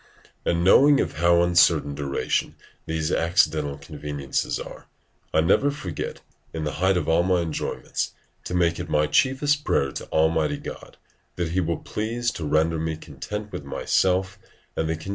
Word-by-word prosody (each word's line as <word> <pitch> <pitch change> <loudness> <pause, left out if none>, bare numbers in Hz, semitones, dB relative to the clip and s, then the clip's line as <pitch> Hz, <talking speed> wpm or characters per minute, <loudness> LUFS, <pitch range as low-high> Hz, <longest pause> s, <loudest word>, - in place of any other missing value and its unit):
And 85 0 +1
knowing 140 +9 +6
of - - -2
how 85 +1 +4
uncertain 85 -4 +4
duration 70 -1 -1 0.3
these 80 +1 -1
accidental 80 -4 +1
conveniences 75 -2 -3
are, - - -9 0.4
I 80 - +3
never 95 - +3
forget, 95 - -5 0.3
in 80 - -3
the 75 - -1
height 95 0 +3
of 80 -3 -2
all 80 +1 +4
my 90 0 +2
enjoyments, 80 -2 -3 0.3
to 90 - -3
make 85 -1 +2
it - - -5
my 75 0 +3
chiefest 140 - +2
prayer 70 - +1
to - - -6
Almighty 80 -1 +1
God, - - -9 0.4
that 85 -2 -2
He 90 +3 0
will 85 -2 0
please 120 +2 -2
to 80 - -5
render 80 +2 +2
me 80 0 -2
content 105 +5 -7
with - - -6
myself 95 +7 0 0.4
and 80 - -1
the - - +1
condition - - -5
wherein - - -14
I - - -11
am. 95 - -7
85 Hz, 180 wpm, -24 LUFS, 80-95 Hz, 0.4 s, knowing